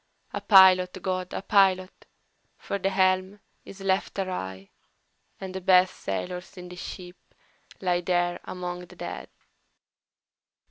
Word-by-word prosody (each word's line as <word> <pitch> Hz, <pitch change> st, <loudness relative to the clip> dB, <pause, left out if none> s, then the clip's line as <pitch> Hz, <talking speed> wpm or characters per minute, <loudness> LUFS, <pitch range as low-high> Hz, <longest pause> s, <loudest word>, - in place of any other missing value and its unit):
A -, -, -3 dB
pilot, 190 Hz, -2 st, +6 dB
GOD, 185 Hz, 0 st, -3 dB
a -, -, -5 dB
pilot! 190 Hz, -2 st, +2 dB, 0.5 s
for 200 Hz, -, -4 dB
the 195 Hz, -, 0 dB
helm 190 Hz, +1 st, +1 dB, 0.3 s
is 195 Hz, -, -11 dB
left 195 Hz, +1 st, -1 dB
awry, 100 Hz, -, -5 dB, 0.7 s
And 190 Hz, -1 st, -7 dB
the 190 Hz, -, -5 dB
best 185 Hz, 0 st, +4 dB
sailors 180 Hz, -, -5 dB
in 180 Hz, 0 st, -9 dB
the 180 Hz, -, -9 dB
ship 180 Hz, 0 st, -8 dB, 0.6 s
lie 180 Hz, -2 st, +1 dB
there 175 Hz, 0 st, 0 dB
among 180 Hz, -1 st, -6 dB
the -, -, -15 dB
dead!" -, -, -7 dB
185 Hz, 130 wpm, -26 LUFS, 180-190 Hz, 0.7 s, pilot